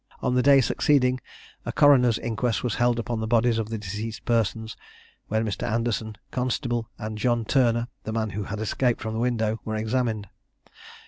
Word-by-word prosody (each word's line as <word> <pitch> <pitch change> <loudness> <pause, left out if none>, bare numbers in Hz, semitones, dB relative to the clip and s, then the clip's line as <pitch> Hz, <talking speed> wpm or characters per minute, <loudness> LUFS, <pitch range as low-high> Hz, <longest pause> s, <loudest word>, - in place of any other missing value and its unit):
On 125 - +1
the 125 - +3
day 140 +1 +6
succeeding, 130 0 +2 0.4
a - - -3
coroner's 125 -5 +5
inquest 115 0 -1
was 120 -4 0
held 120 -1 +2
upon 115 -1 -2
the 110 - -2
bodies 115 0 +3
of 110 -1 -3
the 115 - -3
deceased 105 +1 -6
persons, 110 -1 0 0.5
when 110 +1 0
Mr. 105 -3 -3
Anderson, 110 -1 -1 0.2
constable, 120 -2 -1
and 110 -1 -5
John 120 0 +1
Turner, 120 -2 +2 0.2
the 110 - -4
man 110 -1 -1
who 100 +1 -4
had 105 +2 -5
escaped 120 +3 0
from 110 -1 -4
the 110 - -2
window, 115 -2 0
were 110 - -3
examined. 110 -1 -1
115 Hz, 180 wpm, -25 LUFS, 110-125 Hz, 0.5 s, day